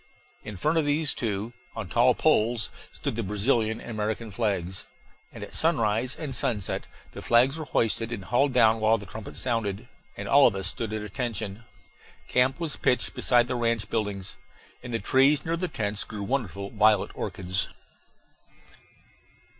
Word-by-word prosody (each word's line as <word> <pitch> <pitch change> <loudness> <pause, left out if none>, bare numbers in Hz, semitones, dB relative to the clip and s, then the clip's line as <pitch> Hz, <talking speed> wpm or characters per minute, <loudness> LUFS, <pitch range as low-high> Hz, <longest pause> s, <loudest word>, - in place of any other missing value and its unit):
In 105 -2 -7
front 155 - +2
of 155 - +1
these 145 +1 +1
two, 110 0 -3 0.2
on - - -5
tall 120 +1 +3
poles, 120 -6 +2 0.2
stood - - -4
the 115 - -1
Brazilian 110 +2 +1
and - - -8
American 110 +1 -3
flags; 95 -4 -2 0.4
and - - -9
at - - -9
sunrise 125 -6 +2
and 150 -4 -5
sunset 105 -8 0 0.2
the - - -9
flags 125 +4 +4
were 160 -1 -5
hoisted 115 -2 0
and 100 -5 -5
hauled 130 +7 +2
down 115 -3 +4
while 110 +1 +3
the 100 - -9
trumpet 110 0 -9
sounded 115 -2 -1 0.3
and - - -5
all 140 0 +7
of - - 0
us 95 -1 -3
stood 110 +4 -1
at 110 -1 -3
attention. 110 -1 -4 0.6
Camp 130 +4 +2
was 165 -4 0
pitched 125 - +1
beside 120 -1 +3
the - - -2
ranch 115 -3 0
buildings. 100 -4 -3 0.4
In 125 - -8
the 115 - 0
trees 135 +4 +3
near 165 +1 0
the 180 +2 -2
tents 105 - -2
grew 105 -2 -7
wonderful 100 -5 -3
violet 105 -2 +3
orchids. 95 +1 -2
115 Hz, 165 wpm, -26 LUFS, 105-130 Hz, 0.6 s, all